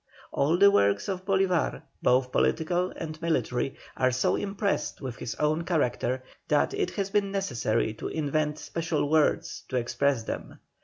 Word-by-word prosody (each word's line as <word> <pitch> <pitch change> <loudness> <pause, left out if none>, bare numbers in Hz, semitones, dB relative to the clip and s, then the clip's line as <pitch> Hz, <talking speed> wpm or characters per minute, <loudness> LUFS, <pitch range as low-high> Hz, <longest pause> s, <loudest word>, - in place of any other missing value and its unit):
All 155 +5 +2
the 200 +2 +7
works 100 - +2
of 185 -1 -3
Bolívar, 190 -3 +1 0.2
both 125 0 +3
political 175 +6 +1
and 155 -1 -6
military, 135 -6 0 0.2
are 130 0 +3
so 125 0 +1
impressed 200 0 -1
with 130 -3 -6
his 115 - -5
own 155 +2 +1
character 130 -6 0 0.2
that - - +2
it 405 -2 0
has 195 -1 -2
been 200 -1 +1
necessary 120 - 0
to 110 - -6
invent 150 0 -1
special 165 -3 -2
words 155 -1 +2
to 130 - -3
express 125 +1 +1
them. - - -6
155 Hz, 155 wpm, -28 LUFS, 130-185 Hz, 0.2 s, the